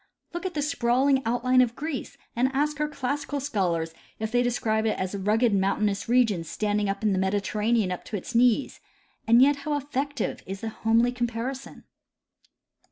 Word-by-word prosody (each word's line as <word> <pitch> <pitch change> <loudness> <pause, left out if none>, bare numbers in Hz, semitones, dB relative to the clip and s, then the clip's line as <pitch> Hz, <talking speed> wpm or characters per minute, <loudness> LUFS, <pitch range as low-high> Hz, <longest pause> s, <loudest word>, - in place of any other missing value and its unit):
Look 345 +2 -3
at 360 - -8
the 295 - 0
sprawling 265 -1 +2
outline 255 +2 +3
of 240 -1 +1
Greece, 300 -3 -5 0.2
and 250 +3 +2
ask 295 +1 0
our 300 - +1
classical 285 0 -3
scholars 175 - -1 0.2
if 220 0 -4
they 245 0 +3
describe 225 -3 0
it 215 - 0
as 185 +1 -3
a 200 - -3
rugo 210 +5 +1
ed 225 - +2
mountainous 200 +2 0
region 230 -8 +3
standing 205 +4 -1
in 200 +1 0
the 190 - 0
Mediterranean 205 +2 0
up 180 - -4
to 210 - -4
its 195 - -8
knees; 245 +3 +2 0.5
and 235 +3 +7
yet 285 +1 +4
how 290 +1 -2
effective 285 0 -3
is 195 +1 -6
the 225 - -3
homely 225 +2 +2
comparison 245 +2 -4
235 Hz, 175 wpm, -26 LUFS, 210-270 Hz, 0.5 s, and